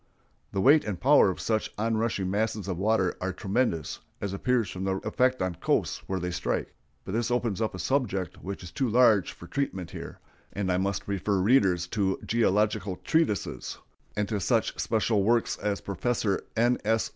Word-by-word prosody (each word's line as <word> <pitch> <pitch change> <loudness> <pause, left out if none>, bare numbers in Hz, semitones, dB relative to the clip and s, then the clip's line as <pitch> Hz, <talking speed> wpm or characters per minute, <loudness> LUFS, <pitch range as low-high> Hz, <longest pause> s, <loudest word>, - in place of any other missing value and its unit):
The 95 - -1
weight 145 +8 +6
and 100 -5 -4
power 140 -3 +6
of 95 - -4
such 110 -1 -1
on 115 +2 0
rushing 110 -4 0
masses 105 -1 -1
of 90 -3 -3
water 100 -2 +2
are 95 +1 -1
tremendous, 95 - -1 0.2
as 100 -1 -3
appears 120 +2 +1
from 95 - -5
the 95 0 0
effect 130 -4 +2
on 90 -1 -1
coasts - - 0
where 95 -1 -1
they 90 0 -3
strike; 90 - -2 0.3
but - - -5
this 115 +3 0
opens 120 -4 0
up 110 -4 -1
a - - -5
subject 100 - -1
which 95 0 -6
is 90 - -9
too 130 +6 -1
large 110 -4 +4
for - - -12
treatment 95 -8 -3
here, - - -8 0.4
and 100 -2 -1
I 90 - +2
must 100 0 -2
refer 100 0 0
readers 95 -5 +3
to 95 -3 0
geological 105 -3 +1
treatises, 160 - 0 0.4
and 105 -1 +1
to 105 -2 -1
such 95 - +1
special 110 -1 +1
works 115 +3 +2
as 100 -1 -1
Professor 100 0 -1
N. 120 +2 +3
S. 110 +1 +1
105 Hz, 185 wpm, -28 LUFS, 95-115 Hz, 0.4 s, weight